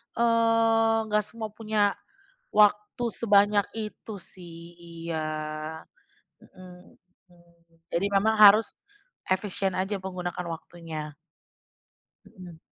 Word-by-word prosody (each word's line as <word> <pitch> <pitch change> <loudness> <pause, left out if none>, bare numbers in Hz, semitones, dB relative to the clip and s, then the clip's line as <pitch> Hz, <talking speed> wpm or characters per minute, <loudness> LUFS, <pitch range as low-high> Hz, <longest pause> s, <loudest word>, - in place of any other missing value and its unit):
eee, 230 -1 +3
nggak 210 0 +2
semua 225 -2 -7
punya, 215 -2 0 0.6
waktu 210 +3 +3
sebanyak 205 -2 +3
itu, 215 -1 -7
sih. 170 -1 -13
Iya, 165 -2 -6 1.2
mhm, 180 -1 -16 0.3
hmm. 170 -1 -24 0.4
Jadi 185 +4 0
memang 220 +3 +3
harus, 210 +1 +7 0.5
efisien 190 0 -1
aja, 195 +1 -2
menggunakan 180 -1 -5
waktunya. 160 -2 -7 1.1
Mhm. 175 -3 -13
195 Hz, 90 wpm, -26 LUFS, 175-215 Hz, 1.2 s, harus